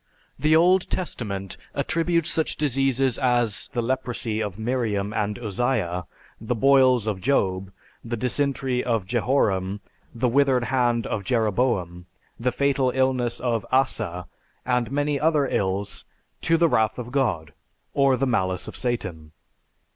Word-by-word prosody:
The 155 +3 +4
Old 180 +3 +4
Testament 100 - -4 0.2
attributes 170 0 0
such 160 - 0
diseases 135 -3 +1
as 120 -7 +1
the 120 -3 -1
leprosy 120 -3 -2
of 100 -3 -4
Miriam 110 -3 -1
and 105 -1 -1
Uzziah, 105 -6 -1 0.3
the 115 +3 -2
boils 130 -2 +4
of 105 -4 -2
Job, 95 -8 0 0.3
the 120 0 -4
dysentery 130 +1 -1
of 115 -5 0
Jehoram, 100 -4 0 0.3
the 120 +2 0
withered 130 0 +3
hand 120 -3 +2
of 100 - -3
Jeroboam, 105 -6 0 0.3
the 125 +2 0
fatal 135 0 +1
illness 130 -2 +1
of 115 -4 -1
Asa, 110 -9 0 0.4
and 125 -2 0
many 145 0 0
other 150 -2 +2
ills, 100 -2 -2 0.4
to 165 - +2
the 170 0 +4
wrath 110 -7 +1
of 120 -1 -6
God, 105 - -1 0.4
or 135 -2 +3
the 135 - +1
malice 95 -7 -1
of - - -8
Satan. 90 -11 -4
120 Hz, 135 wpm, -24 LUFS, 105-135 Hz, 0.4 s, The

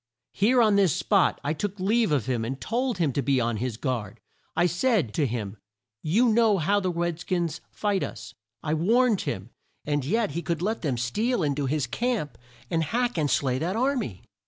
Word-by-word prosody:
Here 235 +5 +4
on 210 -2 +4
this 190 -7 +3
spot 200 -4 +2
I 145 - 0
took 200 +4 -4
leave 215 +1 +2
of 140 -7 +1
him 125 -3 -1
and 130 +4 -4
told 245 0 -1
him 160 -6 +1
to 140 - 0
be 135 0 +2
on 115 -2 0
his 120 0 -3
guard! 120 -7 -3 0.4
I 175 +2 +3
said 180 - +1
to 145 +4 +1
him 110 -3 -4 0.4
'you 220 +11 +3
know 220 -2 +4
how 195 +5 +2
the 185 -2 -1
red 170 -1 -2
skins 175 -3 -2
fight 205 -3 -1
us!' 105 -2 -6 0.3
I 150 - -1
warned 220 +6 +3
him 95 +5 -5 0.3
and 145 -1 0
yet 215 - 0
he 170 +4 -3
could 170 -1 -2
let 220 +3 -1
them 140 -7 -1
steal 205 - 0
in 145 -2 +1
to 140 -1 -2
his 145 0 0
camp 150 - -2 0.3
and 165 -1 +1
hack 240 +9 0
and 155 -4 +1
slay 130 -1 +1
that 175 +6 -1
ar 265 +5 +2
my!" 110 - -4
170 Hz, 205 wpm, -26 LUFS, 135-215 Hz, 0.4 s, Here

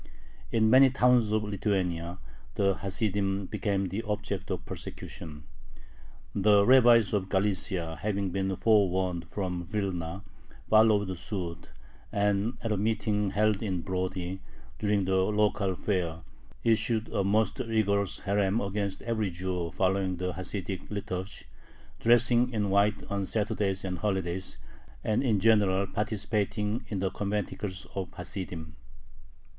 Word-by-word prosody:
In 110 -1 +3
many 130 +1 +8
towns 125 -4 +3
of 110 0 +1
Lithuania 95 -4 -1 0.4
the 100 -1 +3
Hasidim 100 0 -1
became 100 0 -1
the 100 +5 -2
object 105 -3 -3
of - - -3
persecution. 75 -3 -7 0.9
The 100 0 +4
rabbis 120 -4 +6
of 95 -2 0
Galicia, 95 -4 -1
having 100 -2 -1
been 95 0 -1
forewarned 95 -5 +2
from 90 -3 -3
Vilna, 95 -2 -3 0.4
followed 105 -3 +4
suit, 85 -2 -5 0.4
and 100 +3 +1
at 115 - -1
a 105 - +1
meeting 105 -1 0
held 105 +1 +2
in 95 -6 -1
Brody, 95 0 -3 0.4
during 105 -2 +1
the 95 0 +2
local 100 -1 +1
fair, 85 -5 -1 0.4
issued 115 0 +2
a 100 - 0
most 105 +5 +1
rigorous 100 -5 0
herem 100 +1 +1
against 100 -1 -3
every 110 -3 -1
Jew 90 -1 -3
following 95 0 0
the 90 0 -2
Hasidic 95 +1 -5
liturgy, 95 -2 -5 0.5
dressing 120 +1 +4
in 105 -4 -1
white 100 +1 +2
on 100 -1 -1
Saturdays 105 -3 -1
and 90 -2 -3
holidays, 95 -2 -2 0.5
and 110 - +1
in 115 -7 +2
general 100 -2 +4
participating 105 +1 -2
in 105 - -3
the 95 0 0
conventicles 100 -1 -3
of 95 -2 -3
the - - -22
Hasidim. 90 -4 -6
100 Hz, 130 wpm, -29 LUFS, 95-105 Hz, 0.9 s, many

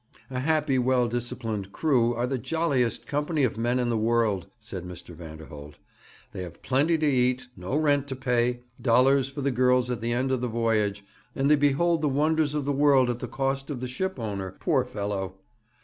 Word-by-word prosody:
'A 125 - -2
happy, 150 -1 +1
well 125 -1 +2
disciplined 115 -4 -4
crew 125 -3 +2
are 120 +1 0
the 130 0 -2
jolliest 140 -4 0
company 150 +1 -1
of 125 - +1
men 120 +2 0
in 120 -1 0
the - - +1
world,' 110 -5 +1
said 105 -5 -7
Mr. 90 -1 -10
Vanderholt. 80 -3 -10 0.6
'They 95 - -5
have 85 -2 -9
plenty 145 +6 +2
to 155 - 0
eat, 125 -2 +1
no 90 +7 -4
rent 145 -2 +2
to 135 - -4
pay, 120 -1 0 0.2
dollars 135 +2 +4
for 140 +1 -6
the 140 0 +1
girls 125 0 +2
at 120 - -3
the 115 +1 -1
end 130 +2 0
of 130 -2 0
the 125 - 0
voyage, 110 -3 0 0.3
and 140 +2 +2
they - - +8
behold 150 +4 +2
the 150 - +2
wonders 150 +1 +1
of 145 -2 -1
the 145 - 0
world 135 -3 +4
at 120 - -5
the 125 - -4
cost 135 +2 -2
of 140 -4 -4
the 125 - -4
ship 190 +10 -3
owner 100 -5 -4
poor - - +2
fellow! 100 -2 -4
125 Hz, 200 wpm, -26 LUFS, 115-140 Hz, 0.6 s, they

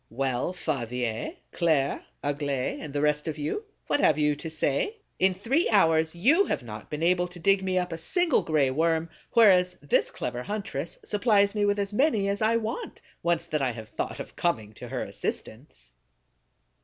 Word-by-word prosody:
Well, 130 +5 -1
Favier, 125 - -3 0.2
Claire, 155 -6 +1 0.2
Aglaé, 140 -2 -1
and 150 - -7
the 145 0 -1
rest 150 +1 +1
of 160 - -3
you, 155 - -3 0.2
what - - +1
have 155 - +4
you 150 -1 +2
to 160 +3 -7
say? 160 - -1 0.2
In 190 0 +3
three 255 - +1
hours 160 -5 +3
you 290 - +4
have - - -2
not 110 -2 -9
been 150 +1 -4
able 180 +1 +3
to 180 0 -12
dig 195 +3 +3
me 185 -1 -1
up 180 -1 0
a 165 - -4
single 350 - +2
Gray 150 -4 +2
Worm, 160 +3 +1 0.2
whereas 185 -6 +5
this 145 - +1
clever 125 0 -4
huntress 175 -4 -4
supplies 205 -2 +3
me 210 -1 +1
with 205 0 +2
as 200 0 -2
many 220 -5 +2
as 200 +1 -1
I 220 +1 +3
want, 230 - -4 0.2
once 170 -1 +1
that 155 -3 -2
I 130 -3 0
have 110 -2 -9
thought - - -4
of - - -8
coming 110 -12 -1
to - - -9
her - - -3
assistance! 110 - -6
165 Hz, 185 wpm, -27 LUFS, 145-200 Hz, 0.2 s, whereas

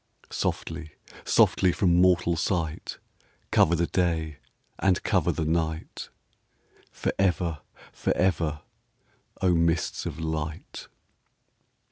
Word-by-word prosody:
Softly, 80 -2 -3 0.3
softly 90 - +4
from 90 -1 +3
mortal 90 -2 +3
sight 80 -2 -2 0.5
Cover 85 - +4
the 85 +1 +1
day 80 -4 -1 0.4
and 95 -2 +2
cover - - +2
the 80 - -2
night 80 0 -2 0.8
Forever, 90 -4 0 0.3
forever, 80 -5 0 0.8
O 90 -1 +4
mists 85 -1 0
of - - -6
light 80 -1 -5
85 Hz, 90 wpm, -26 LUFS, 80-90 Hz, 0.8 s, softly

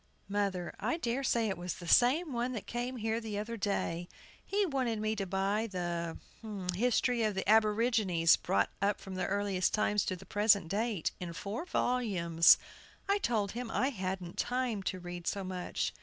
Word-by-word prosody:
MOTHER. 195 -3 -1
I 330 - 0
dare 255 -3 -1
say 235 -3 +2
it 190 -4 -3
was 175 -1 -4
the 175 - -9
same 275 - +4
one 245 +2 -1
that 220 - -5
came 245 +2 -3
here 225 0 -1
the 215 -2 -4
other 215 +3 -3
day. 180 -4 -2 0.3
He 405 0 +1
wanted 260 - -1
me 215 +1 0
to 195 -2 -3
buy 195 +4 0
the 175 -3 -3 0.6
"History 245 +3 +2
of 215 -2 +1
the 190 - -3
Aborigines, 215 -5 +4
Brought 100 0 0
up 200 0 +1
from 190 -1 -8
Earliest 195 0 0
Times 210 -1 +2
to 185 - -1
the 180 - -12
Present 205 -4 +3
Date," 210 -2 -1
in 175 -2 -5
four 205 - -4
volumes. 190 - +4 0.5
I 400 +1 +2
told 215 - 0
him 240 0 -5
I 260 +4 +1
hadn't 185 -6 -4
time 245 -4 0
to 185 - -4
read 175 -1 -7
so 200 - -1
much. 185 -1 -3
205 Hz, 175 wpm, -32 LUFS, 185-235 Hz, 0.6 s, same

